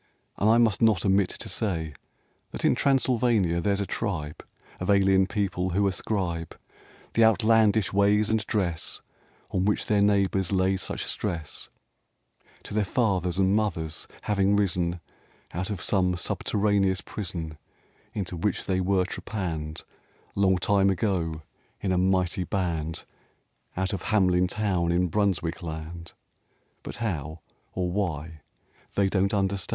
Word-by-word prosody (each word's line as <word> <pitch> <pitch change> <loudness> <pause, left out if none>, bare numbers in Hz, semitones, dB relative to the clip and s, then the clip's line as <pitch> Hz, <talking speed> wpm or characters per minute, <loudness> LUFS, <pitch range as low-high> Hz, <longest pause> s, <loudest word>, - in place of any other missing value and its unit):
And 105 - +3
I 115 - +6
must 115 -4 +3
not 110 -5 +3
omit 95 -1 +3
to - - -6
say 80 -7 -2 0.6
That - - -4
in - - +5
Transylvania 120 -10 +2
there's 100 +2 +1
a - - -1
tribe 85 -9 -4 0.4
Of 90 - -4
alien 95 -1 +4
people 95 -3 -1
who 100 +3 +2
ascribe 90 -5 -2 0.6
The 115 - +4
outlandish 110 -2 +4
ways 105 +1 +3
and 110 -1 +1
dress 90 -7 -1 0.5
On 90 - 0
which 105 +1 +1
their 105 -1 +2
neighbors 100 -2 +2
lay 95 0 +2
such - - -4
stress, 85 -7 -4 0.9
To - - -9
their 105 0 +2
fathers 95 -5 0
and 95 +1 +3
mothers 85 -8 -2 0.2
having 100 -1 +2
risen 90 -3 0 0.5
Out 90 +3 -3
of 100 -4 -3
some 90 -2 +1
subterraneous 100 +1 +1
prison 80 -6 -6 0.6
Into 95 -3 -3
which 90 +3 -1
they 95 -1 0
were 95 0 +2
trepanned 80 -7 -4 0.5
Long 95 -2 +3
time 100 +1 +3
ago 85 -5 -1 0.4
in 95 - -1
a 90 - +2
mighty 95 -1 +1
band 85 -5 -2 0.7
Out 95 +2 -1
of 100 - -4
Harnelin 90 -4 +3
town 95 -4 0
in 90 +1 +2
Brunswick 95 -4 0
land, 85 +1 -7 0.7
But - - -7
how 80 -8 -4 0.3
or 90 -1 -1
why, 80 -5 -3 0.5
they 100 -1 +3
don't 95 0 +1
understand. 95 -2 0
95 Hz, 135 wpm, -26 LUFS, 85-100 Hz, 0.9 s, I